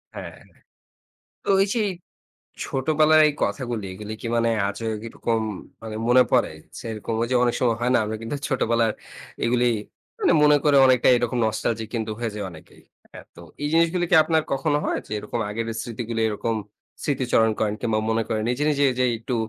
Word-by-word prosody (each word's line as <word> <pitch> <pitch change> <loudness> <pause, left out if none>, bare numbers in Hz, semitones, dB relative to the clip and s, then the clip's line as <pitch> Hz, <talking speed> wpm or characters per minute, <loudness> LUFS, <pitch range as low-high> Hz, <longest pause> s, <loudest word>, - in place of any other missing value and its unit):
হ্যাঁ। - - -8 1.1
তো - - -8
ওই 195 - +5
যে, 230 - +1 0.8
ছোটবেলার 155 +3 +3
এই - - -1
কথাগুলি 120 -6 -2
এগুলি 105 +3 -7
কি - - -6
মানে 115 0 +2 0.2
আজও 110 +3 -4 0.2
কিরকম 115 0 -2 0.7
মনে 125 +1 +7
পড়ে - - +3 0.3
যে - - -8
এরকম, 110 +1 -4
ঐযে 125 +2 -1
অনেক 120 -1 +2
সময় 115 -3 +2
হয় 125 +1 +1
না, - - +5
আমরা 110 +1 -3
কিন্তু 115 +6 -3
ছোটবেলার 115 -3 +1 0.5
এগুলি 125 +1 +2 0.5
মানে 395 - +3
মনে 150 0 +6
করে 145 -2 +4
অনেকটা 130 -2 +4
এরকম 120 0 -1
নস্টালজিক 110 0 -2
কিন্তু 110 -1 -2
হয়ে 115 -2 -2
যাই 105 - -4
অনেকেই। 80 -2 -15 0.3
হ্যাঁ? - - -11
তো 85 - -13 0.2
এই 145 - 0
জিনিসগুলি 170 +2 +3
কি - - +5
আপনার 160 -2 +2
কখনো 145 +2 +1
হয় - - 0
যে - - -19
এরকম 110 +3 -4
আগের 115 +2 -3 0.2
স্মৃতিগুলো 115 -1 -4
এরকম 110 +2 -2 0.5
স্মৃতিচারণ 125 -5 +2
করেন 105 -1 0
কিংবা 110 -3 0
মনে 115 0 +1
করেন 110 -1 -1
নিজে, 125 +4 -1
নিজে 145 -1 +2
যে 130 - +3
একটু 120 +2 -4
120 Hz, 175 wpm, -24 LUFS, 110-135 Hz, 1.1 s, মনে